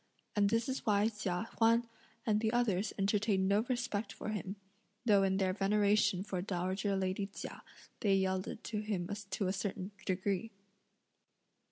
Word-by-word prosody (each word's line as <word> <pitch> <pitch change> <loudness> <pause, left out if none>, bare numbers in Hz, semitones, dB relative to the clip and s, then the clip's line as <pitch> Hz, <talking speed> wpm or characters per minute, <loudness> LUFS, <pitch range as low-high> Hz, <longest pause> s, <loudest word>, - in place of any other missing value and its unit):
And 200 -1 +4
this 230 +2 +1
is 265 0 -2
why 210 0 +3
Chia 210 -1 -2
Huan 230 +1 +4 0.4
and 215 -3 +3
the 220 0 +1
others 220 -4 +1
entertained 200 -1 +2
no 200 +1 +4
respect 225 -4 -1
for - - -6
him, 205 -2 -3 0.5
though 205 -4 +6
in 190 0 +2
their 190 -1 +2
veneration 205 -1 +3
for 190 -3 -3
dowager 190 +2 -1
lady 190 +1 -1
Chia, 200 - -8 0.4
they 200 -3 +3
yielded 190 +2 -1
to 215 -2 -3
him 205 -5 -2 0.2
to 190 0 -1
a 185 - +1
certain 195 0 -3 0.2
degree. 195 +3 0
200 Hz, 155 wpm, -34 LUFS, 190-215 Hz, 0.5 s, though